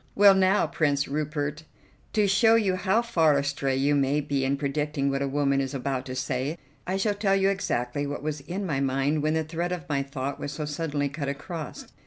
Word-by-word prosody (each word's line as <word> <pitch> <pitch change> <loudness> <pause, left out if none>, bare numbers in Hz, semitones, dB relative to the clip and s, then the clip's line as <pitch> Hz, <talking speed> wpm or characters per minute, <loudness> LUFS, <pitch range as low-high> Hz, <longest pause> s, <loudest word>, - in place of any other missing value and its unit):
"Well, 200 0 +8
now, 190 +1 +3
Prince 145 -2 0
Rupert, 150 +1 -3 0.5
to 210 -2 +3
show 220 +4 +5
you 200 -5 +2
how 190 +5 +1
far 160 -10 +3
astray 140 -1 -1
you 140 +2 +2
may 140 +1 +2
be 140 -2 -1
in 135 +1 +1
predicting 140 0 -1
what 135 0 -1
a 140 - 0
woman 140 0 +1
is 135 +1 -3
about 130 0 -2
to 130 - -5
say, 130 +4 -2 0.3
I 190 +1 0
shall 205 +2 +1
tell 200 -1 +1
you 195 0 +3
exactly 145 -8 -1
what 145 0 -5
was 150 -1 -3
in 185 +7 -4
my 150 -7 -1
mind 135 +3 +1
when 155 +1 +1
the 160 - +1
thread 170 +3 -3
of 180 -4 -4
my 140 -2 0
thought 140 0 -4
was 145 - -4
so 150 +1 -4
suddenly 145 -1 -2
cut 140 0 -4
across. 150 +3 -6
145 Hz, 215 wpm, -26 LUFS, 140-180 Hz, 0.5 s, Well